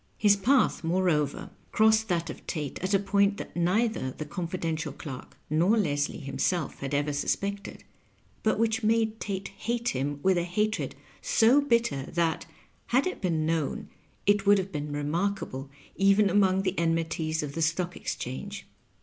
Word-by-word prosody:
His 205 Hz, -1 st, +5 dB
path, 250 Hz, +4 st, +2 dB
moreover, 165 Hz, -4 st, 0 dB, 0.2 s
crossed 220 Hz, 0 st, +4 dB
that 170 Hz, -4 st, -1 dB
of -, -, -13 dB
Tate 150 Hz, -5 st, -4 dB
at 190 Hz, +2 st, 0 dB
a -, -, +7 dB
point 200 Hz, +1 st, +2 dB
that -, -, -8 dB
neither 180 Hz, -, +1 dB
the 150 Hz, +4 st, -6 dB
confidential 165 Hz, -1 st, -3 dB
clerk 135 Hz, -2 st, -9 dB
nor 170 Hz, +9 st, +3 dB
Leslie 145 Hz, -7 st, 0 dB
himself 155 Hz, +3 st, -2 dB
had 140 Hz, +1 st, -3 dB
ever 145 Hz, +1 st, 0 dB
suspected, 200 Hz, +7 st, -3 dB, 0.6 s
but 215 Hz, -, +1 dB
which 225 Hz, +1 st, +1 dB
made 220 Hz, 0 st, +1 dB
Tate 195 Hz, -1 st, -4 dB
hate 235 Hz, +1 st, -2 dB
him 140 Hz, +2 st, -2 dB
with 190 Hz, -2 st, +3 dB
a -, -, 0 dB
hatred 210 Hz, +5 st, -1 dB, 0.3 s
so 275 Hz, -, +4 dB
bitter 235 Hz, -, +1 dB
that, 165 Hz, -1 st, 0 dB, 0.4 s
had 260 Hz, +3 st, +2 dB
it 370 Hz, -, -3 dB
been 165 Hz, -5 st, 0 dB
known, 160 Hz, -3 st, -1 dB, 0.4 s
it 205 Hz, 0 st, +3 dB
would 205 Hz, 0 st, +7 dB
have 190 Hz, 0 st, -3 dB
been 150 Hz, -2 st, -4 dB
remarkable 145 Hz, -2 st, -2 dB, 0.3 s
even 195 Hz, +1 st, +4 dB
among 190 Hz, -1 st, +3 dB
the 185 Hz, -1 st, -1 dB
enmities 165 Hz, -1 st, 0 dB
of 145 Hz, -1 st, -5 dB
the 165 Hz, -, -3 dB
Stock 170 Hz, +3 st, 0 dB
Exchange. 200 Hz, +12 st, -5 dB
180 Hz, 160 wpm, -28 LUFS, 155-205 Hz, 0.6 s, a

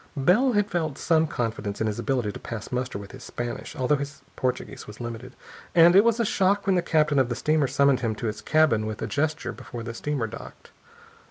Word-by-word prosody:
Bell 210 Hz, -, +4 dB
had 205 Hz, -1 st, +1 dB
felt 160 Hz, -6 st, -1 dB
some 160 Hz, -1 st, +2 dB
confidence 110 Hz, -6 st, -3 dB
in 110 Hz, -, 0 dB
his 105 Hz, -1 st, -2 dB
ability 125 Hz, -6 st, 0 dB
to -, -, -9 dB
pass 115 Hz, -2 st, -7 dB
muster 125 Hz, -3 st, -2 dB
with 100 Hz, 0 st, -9 dB
his 130 Hz, 0 st, -11 dB
Spanish, 120 Hz, 0 st, -5 dB
though 130 Hz, +3 st, +1 dB
his 140 Hz, 0 st, -7 dB
Portuguese 130 Hz, -1 st, -3 dB
was 105 Hz, -, -11 dB
limited, 120 Hz, +1 st, -7 dB, 0.4 s
and 170 Hz, +1 st, +7 dB
it 200 Hz, -, +8 dB
was 235 Hz, 0 st, +2 dB
a 230 Hz, -, +2 dB
shock 200 Hz, 0 st, +2 dB
when 195 Hz, -, +3 dB
the 180 Hz, -, +3 dB
captain 155 Hz, -4 st, +2 dB
of 130 Hz, -2 st, +2 dB
the 120 Hz, -, -1 dB
steamer 150 Hz, +2 st, +1 dB
summoned 140 Hz, 0 st, +3 dB
him 115 Hz, -3 st, -1 dB
to 115 Hz, -, -6 dB
his 110 Hz, -1 st, -3 dB
cabin 140 Hz, -7 st, +3 dB
with 110 Hz, -1 st, -5 dB
a -, -, 0 dB
gesture, 155 Hz, +2 st, -1 dB
before 120 Hz, -2 st, -8 dB
the 115 Hz, 0 st, -5 dB
steamer 140 Hz, 0 st, -2 dB
docked. 115 Hz, +1 st, -10 dB
135 Hz, 225 wpm, -25 LUFS, 115-160 Hz, 0.4 s, it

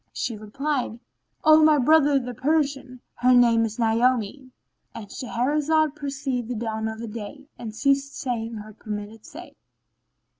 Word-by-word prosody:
She 235 Hz, -, -3 dB
replied, 250 Hz, +3 st, -3 dB, 0.5 s
"O 310 Hz, 0 st, +7 dB
my 305 Hz, -1 st, +6 dB
brother 290 Hz, +1 st, +4 dB
the 250 Hz, -2 st, -3 dB
Persian,[FN#14] 275 Hz, -2 st, -1 dB, 0.2 s
her 250 Hz, +1 st, +4 dB
name 230 Hz, -2 st, +5 dB
is 220 Hz, -1 st, -6 dB
Naomi."— 240 Hz, +2 st, +1 dB, 0.5 s
And 220 Hz, -, -7 dB
Shahrazad 295 Hz, +5 st, 0 dB
perceived 275 Hz, -4 st, -3 dB
the 245 Hz, -, -4 dB
dawn 220 Hz, -1 st, -3 dB
of 220 Hz, 0 st, -6 dB
day 235 Hz, +6 st, -8 dB
and 220 Hz, -2 st, -7 dB
ceased 275 Hz, +2 st, 0 dB
saying 230 Hz, -3 st, -3 dB
her 215 Hz, 0 st, -9 dB
permitted 210 Hz, +1 st, -8 dB
say. -, -, -11 dB
250 Hz, 140 wpm, -24 LUFS, 225-280 Hz, 0.5 s, O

